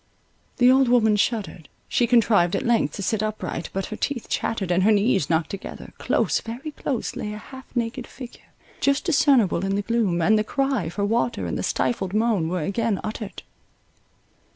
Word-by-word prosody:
The 250 0 +6
old 265 0 +4
woman 220 -3 +4
shuddered, 205 - -2 0.2
she 240 - +1
contrived 215 -7 +3
at - - -2
length 235 -1 +1
to 200 - -5
sit 215 +2 0
upright; 215 -5 -4
but 195 0 -2
her - - -3
teeth 250 +1 -3
chattered, 195 -5 -2
and 175 +1 +3
her 210 +4 +4
knees 205 - +2
knocked 160 -1 +1
together—close, 195 - -2
very 250 +7 -6
close, 270 -4 -3
lay 210 - -4
a - - -6
half 260 +4 -11
naked 240 +1 -2
figure, 250 -3 -12 0.3
just 280 +1 +2
discernible 270 - +3
in 195 0 0
the 205 - -1
gloom, 215 -6 0
and 215 +6 +4
the - - +1
cry 270 - -1
for 200 +4 -2
water 235 +3 0
and - - -3
the - - -2
stifled 195 -5 -1
moan 215 -7 +1
were 180 -2 -2
again 205 +3 -1
uttered. 215 -1 -6
220 Hz, 180 wpm, -24 LUFS, 195-240 Hz, 0.3 s, The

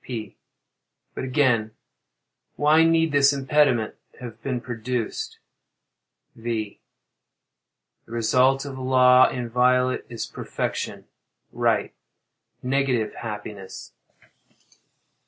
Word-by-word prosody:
P. 110 -5 -6 0.8
But - - -5
again—why 130 +4 0
need 165 -1 +3
this 140 -1 +5
impediment 135 -4 +1 0.2
have 115 -3 -9
been 130 -1 -2
produced? 120 -1 -4 1.0
V. 115 -3 -4 1.3
The - - -16
result 130 +4 +2
of 135 -2 -7
law 130 0 +5
inviolate 125 +1 +1
is 115 -2 -5
perfection—right—negative 130 -4 -4
happiness. 105 -3 -8
125 Hz, 70 wpm, -24 LUFS, 115-135 Hz, 1.3 s, this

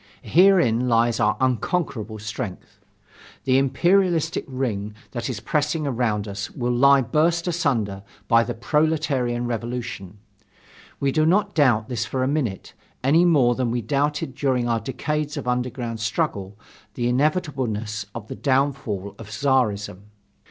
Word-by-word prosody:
Herein 170 - +4
lies 115 -1 +2
our 105 -2 +2
unconquerable 125 - -1
strength. 110 -1 -7 0.6
The 130 0 +3
imperialistic 170 +5 +2
ring 110 -6 -3 0.2
that 120 0 -4
is 120 -6 -4
pressing 150 - -1
around 115 -6 -1
us 100 +2 -5
will 125 -1 -2
lie 140 +3 +5
burst 165 +7 +1
asunder 125 - 0 0.3
by 115 +1 +5
the 120 0 -4
proletarian 140 -3 0
revolution. 120 -4 -5 0.8
We 140 -1 +1
do 155 +3 +2
not 200 +5 +2
doubt 120 -8 +3
this 120 -2 -2
for 130 +1 -2
a - - +1
minute, 130 -10 -2 0.3
any 160 +7 +4
more 140 -8 +4
than 125 -1 -1
we 120 0 -2
doubted 145 +1 -1
during 130 -3 0
our 115 -1 +1
decades 150 +6 -3
of 140 - -5
underground 125 -2 -2
struggle 100 -2 -2 0.4
the 120 -1 -1
inevitableness 125 - -1
of 115 -3 -7
the - - -6
downfall 130 -8 -1
of 110 -2 -10
Czarism. 110 -5 0
125 Hz, 140 wpm, -23 LUFS, 115-145 Hz, 0.8 s, lie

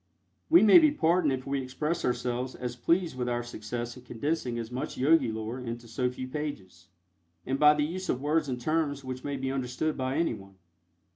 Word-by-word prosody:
We 330 -4 +7
may 220 +11 +9
be 310 -2 +5
pardoned 170 - +2
if 130 -1 -3
we 140 0 -1
express 150 +6 -2
ourselves 125 +1 -1
as 125 -1 -5
pleased 165 +5 +1
with 125 -1 -2
our 120 0 -1
success 120 +1 -5
in 125 - -12
condensing 125 -1 -2
so 115 +2 -11
much 130 +4 -4
Yogi 135 -2 +4
lore 110 +3 -4
into 120 -1 -6
so 125 +2 -1
few 130 +1 -6
pages, 100 - -6 0.6
and 135 +1 -1
by 150 0 +7
the 150 - +1
use 185 +4 -5
of 125 - +1
words 150 +1 0
and 125 -1 -2
terms 145 0 -1
which 130 0 -6
may 140 -1 -3
be 135 0 -2
understood 135 +4 -2
by 130 0 -1
anyone. 105 -12 -2
130 Hz, 200 wpm, -29 LUFS, 120-150 Hz, 0.6 s, may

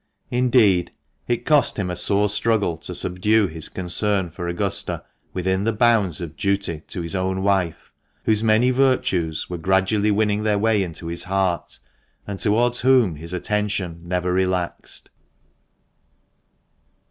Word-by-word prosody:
Indeed, 115 -8 +3 0.3
it 120 -1 -1
cost 150 -2 +3
him 95 -4 -2
a - - -3
sore 100 +3 +2
struggle 105 -3 0
to - - -5
subdue 105 +4 +2
his 80 -3 -4
concern 95 0 0
for 85 +1 -6
Augusta 85 0 -2 0.3
within 95 +1 -1
the 115 - +1
bounds 110 -6 +2
of 80 -2 -6
duty 100 -3 -1
to 90 - -5
his 85 - -5
own 95 0 -1
wife, 95 -5 0 0.3
whose 110 0 +2
many 115 +3 +4
virtues 95 -12 +1
were 90 -1 -5
gradually 95 +4 +2
winning 105 0 +1
their 105 -1 +1
way 110 0 +2
into 85 -2 -5
his 85 +1 -4
heart, 95 -2 -1 0.5
and 100 -2 -6
towards 120 +3 +2
whom 125 - +3
his 85 +3 -7
attention 95 -3 -2
never 90 +1 -1
relaxed. 90 -1 -2
95 Hz, 140 wpm, -22 LUFS, 90-110 Hz, 0.5 s, many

